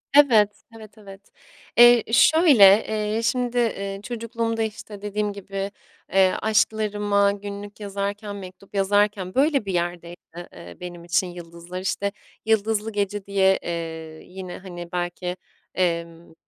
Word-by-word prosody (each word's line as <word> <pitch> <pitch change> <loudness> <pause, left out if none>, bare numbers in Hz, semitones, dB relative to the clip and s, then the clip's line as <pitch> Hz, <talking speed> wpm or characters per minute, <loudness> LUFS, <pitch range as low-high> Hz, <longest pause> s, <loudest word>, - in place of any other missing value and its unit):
Evet. 220 -8 +5
Evet, 220 -1 -13
evet. 195 -1 -14 0.5
Eee, 240 -1 +8
şöyle, 300 - +6 0.2
eee, 215 +1 -1
şimdi, 245 +1 0
eee, 200 -4 -2
çocukluğumda, 230 0 -3
işte, 210 -2 -7
dediğim 205 0 -2
gibi, 195 0 -5 0.4
eee, 190 -1 +4
aşklarıma 210 -2 +2
günlük 205 +1 -8
yazarken, 200 +1 -4
mektup 190 +1 -11
yazarken 200 -1 +1
böyle 275 -3 +2
bir 195 - -3
yerdeydi, 175 0 -3 0.4
eee, 85 0 -12
benim 175 -1 -8
için 175 +2 +1
yıldızlar. 175 0 -9
İşte, 200 +2 -1 0.3
Yıldızlı 220 0 +1
Gece 205 -1 -2
diye, 190 -1 +3
eee, 160 -2 -6
yine, 185 -1 -8
hani, 175 -2 -9
belki, 180 0 -3 0.4
emm, 170 -2 -2
200 Hz, 125 wpm, -23 LUFS, 180-215 Hz, 0.5 s, Eee